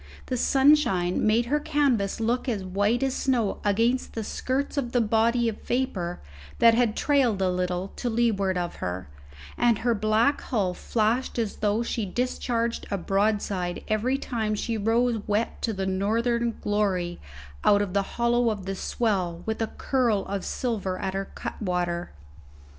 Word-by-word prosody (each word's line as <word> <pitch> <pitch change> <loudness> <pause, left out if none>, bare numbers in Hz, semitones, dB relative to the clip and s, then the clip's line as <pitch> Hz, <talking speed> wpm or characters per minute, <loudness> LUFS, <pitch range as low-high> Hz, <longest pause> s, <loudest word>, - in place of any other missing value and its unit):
The 255 - -2
sunshine 250 -10 +3
made 225 +2 +3
her 295 +5 +1
canvas 270 -10 +1
look 240 +4 0
as 210 -5 -2
white 205 +7 +1
as 265 -1 +1
snow 245 -8 0
against 230 +5 +1
the 225 - -2
skirts 265 +6 -2
of 260 -4 -2
the 245 - +3
body 230 +2 +2
of 220 -2 -3
vapour 210 -9 -2 0.4
that 230 0 +6
had 230 -2 +2
trailed 265 -8 +2
a 185 -1 +2
little 180 +1 -2
to 245 - -2
leeward 215 -5 +1
of 175 -1 -3
her, 90 +1 -4 0.5
and 240 -2 +4
her 240 - +4
black 215 +6 +2
hull 200 -8 -1
flashed 230 +7 0
as 225 -3 -2
though 215 +2 +1
she 230 -1 -2
discharged 235 +1 -1
a 200 - -1
broadside 195 -2 0
every 230 +5 +1
time 220 -6 -2
she 230 +2 -2
rose 225 +2 +1
wet 210 +2 -1
to 230 - 0
the 195 -2 -3
northern 230 +5 0
glory 190 -4 0 0.4
out 205 0 +5
of 190 -3 -5
the 200 - +3 0.2
hollow 235 0 +3
of 205 -4 -4
the 195 - -2
swell 190 -5 -1
with 220 0 -2
a 225 - +1
curl 235 -7 0
of 195 -1 -3
silver 205 -7 -2
at 190 - -3
her 195 0 -2
cutwater. 175 -3 -2
220 Hz, 165 wpm, -26 LUFS, 195-240 Hz, 0.5 s, that